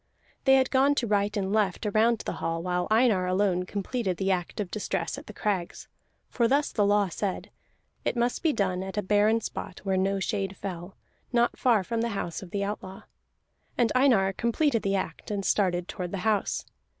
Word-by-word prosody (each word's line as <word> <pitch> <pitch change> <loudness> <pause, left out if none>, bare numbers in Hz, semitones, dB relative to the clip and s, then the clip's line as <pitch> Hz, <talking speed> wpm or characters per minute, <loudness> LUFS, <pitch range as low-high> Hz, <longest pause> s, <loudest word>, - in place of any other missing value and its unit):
They 270 -1 +7
had 260 -1 +2
gone 275 +2 +4
to 250 - 0
right 205 0 +1
and 195 0 -1
left 210 -2 +1
around 220 +2 +2
the - - -2
hall, 165 0 -2
while 180 0 -1
Einar 215 -5 +3
alone 185 -1 +1
completed 200 -1 -2
the 195 +2 0
act 180 +1 -2
of 200 -4 -3
distress 190 -5 -2
at - - -11
the - - -7
crags; 190 -5 -3 0.4
for 235 -2 +1
thus 280 +4 +2
the 205 -2 +2
law 205 -1 +3
said: 190 +2 -4 0.5
it - - -1
must 240 +1 0
be 325 - +3
done 185 -7 0
at 190 +2 -6
a 210 - 0
barren 210 +3 +3
spot 190 - -6
where 190 -1 0
no 195 +1 +1
shade 195 0 -2
fell, 180 -1 -6 0.4
not 240 -1 +2
far 230 -6 +3
from 230 +4 -2
the 235 - 0
house 170 - -4
of 190 - -10
the 200 +2 -2
outlaw. 195 -2 -5 0.7
And 235 -3 +3
Einar 235 -8 +4
completed 235 +3 +1
the 195 0 0
act, 180 -4 -4
and 200 -2 -2
started 180 -3 +1
toward 180 -1 -5
the 195 - -4
house. 215 -3 0
200 Hz, 200 wpm, -27 LUFS, 190-230 Hz, 0.7 s, They